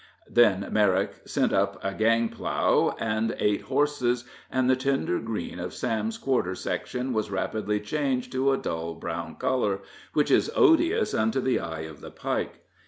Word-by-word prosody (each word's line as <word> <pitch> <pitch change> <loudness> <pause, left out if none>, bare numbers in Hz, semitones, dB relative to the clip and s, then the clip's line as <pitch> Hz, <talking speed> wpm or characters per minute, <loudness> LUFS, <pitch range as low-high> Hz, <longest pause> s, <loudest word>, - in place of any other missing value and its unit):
Then 105 -5 +4
Merrick 100 -2 +2
sent - - +1
up - - +1
a 95 - -1
gang 115 +2 +2
plow - - +1
and 110 0 0
eight 105 -1 +1
horses, 130 -3 0 0.2
and 130 -1 +1
the 130 - +5
tender 135 -7 0
green 115 -2 -4
of - - -5
Sam's 110 0 -1
quarter 120 -9 0
section 125 +6 -3
was 110 -2 -1
rapidly 105 +2 -1
changed 125 +2 -1
to 130 +1 +2
a 135 - +2
dull 80 -5 -4
brown 80 - -5
color, 105 -6 0 0.3
which 150 - +2
is - - +4
odious 370 +3 +4
unto 110 +4 +1
the 130 -1 +1
eye 80 -1 -5
of 80 -2 -9
the - - -8
Pike. - - -3
115 Hz, 165 wpm, -27 LUFS, 105-130 Hz, 0.3 s, the